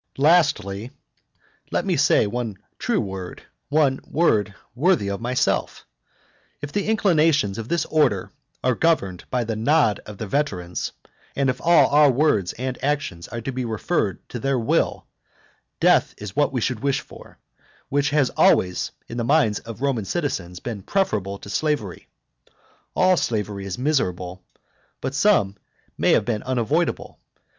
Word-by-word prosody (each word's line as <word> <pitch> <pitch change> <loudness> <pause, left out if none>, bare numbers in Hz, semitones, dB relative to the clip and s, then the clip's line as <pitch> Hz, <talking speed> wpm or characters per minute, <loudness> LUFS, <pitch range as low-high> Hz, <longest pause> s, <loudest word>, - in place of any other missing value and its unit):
Lastly, 140 - +2 0.8
(let - - -1
me - - +1
at - - 0
last - - +4
say - - +4
one 115 -1 -3 0.2
true - - 0
word, 95 -2 -6 0.3
one 140 -2 +2
word 110 -11 +1 0.2
worthy 145 - +2
of 100 - -4
myself!) 125 +2 -1 0.7
if 145 0 -6
the 205 +3 -1
inclinations 155 - +2
of 115 - -5
this 170 -2 +1
order 135 -12 +1 0.3
are 130 - +3
governed 105 - 0
by 125 -2 0
the 115 -1 -3
nod 115 0 +2
of 105 -1 -9
the 110 - -4
veterans, 95 -9 -2 0.4
and 135 -2 +2
if 125 - -9
all 170 0 +5
our 145 0 +6
words 120 - +2
and 130 +1 -5
actions 140 -12 -2
are 120 - -6
to 135 - -4
be 130 0 -3
referred 110 - -2
to 120 - -5
their 135 +3 0
will, 115 -2 0 0.7
death - - +3
is 105 -2 -8
what 145 - +2
we 125 -3 -2
should 125 -1 -1
wish 140 +1 0
for, - - -15 0.5
which 140 0 +1
has 145 -3 +2
always, 90 -1 +3 0.2
in 115 - -7
the 120 - -1
minds 120 -5 +3
of 115 +1 -10
Roman 130 -7 0
citizens, 95 - -3
been 110 -3 -5
preferable 100 - -1
to - - -12
slavery. 145 - -2 0.9
All 185 0 +4
slavery 105 -5 -2
is 95 - -4
miserable; 95 - -1 0.6
but 130 - -4
some 135 - +2 0.4
may - - +3
have 105 - +3
been 110 -3 -1
unavoidable. 125 -4 -1
125 Hz, 155 wpm, -23 LUFS, 100-145 Hz, 0.9 s, our